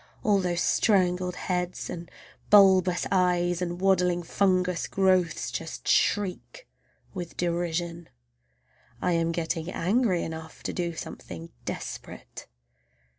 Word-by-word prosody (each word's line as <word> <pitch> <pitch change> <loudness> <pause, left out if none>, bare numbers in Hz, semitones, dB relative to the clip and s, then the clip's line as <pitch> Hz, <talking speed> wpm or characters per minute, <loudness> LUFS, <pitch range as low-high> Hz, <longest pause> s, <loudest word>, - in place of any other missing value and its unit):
All 205 -2 +3
those 175 -1 -1
strangled 180 -3 +2
heads 180 -1 -3
and 170 0 -7 0.4
bulbous 190 -3 +6
eyes 175 -2 +2
and 175 0 -3
waddling 180 -2 +2
fungus 180 -1 +1
growths 185 -4 +1
just 165 - -6
shriek 205 - 0 0.5
with 175 -4 -7
derision! 170 -1 -2 0.9
I 180 - 0
am 165 -1 +1
getting 165 0 -2
angry 190 +1 +1
enough 160 0 -8
to - - -3
do 170 -2 -2
something 85 - -8
desperate. - - -7
180 Hz, 110 wpm, -27 LUFS, 170-185 Hz, 0.9 s, bulbous